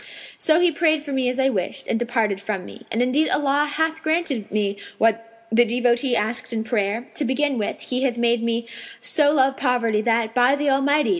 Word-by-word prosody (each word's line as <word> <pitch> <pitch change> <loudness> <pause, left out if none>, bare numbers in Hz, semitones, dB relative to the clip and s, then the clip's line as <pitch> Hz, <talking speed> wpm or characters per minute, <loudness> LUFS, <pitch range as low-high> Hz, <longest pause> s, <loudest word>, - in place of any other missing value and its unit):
So 315 +1 +3
he 350 -1 +4
prayed 315 -1 +1
for 290 - -7
me 260 -2 0
as 250 - -3
I 265 0 +3
wished, 190 -7 -3
and 225 - 0
departed 225 -5 -1
from 200 -3 -4
me. 235 - -13
And 230 +2 +1
indeed 280 +5 +2
Allah 290 +1 +1
hath 320 +1 -1
granted 315 -9 -1
me 200 -1 -1 0.2
what 225 +1 -1
the 235 +2 +5
devotee 245 +2 +1
asked 225 +4 -1
in 225 -1 -2
prayer: 220 +1 -2
to - - -1
begin 275 0 0
with 205 - -3
He 250 0 -2
hath 255 -3 0
made 235 0 +1
me 230 0 -2 0.3
so 295 -3 +2
love 270 -2 +2
poverty 235 -5 +1
that, 225 0 0
by 250 +3 +4
the 285 -1 0
Almighty! 285 +2 +2
245 Hz, 205 wpm, -22 LUFS, 225-285 Hz, 0.3 s, the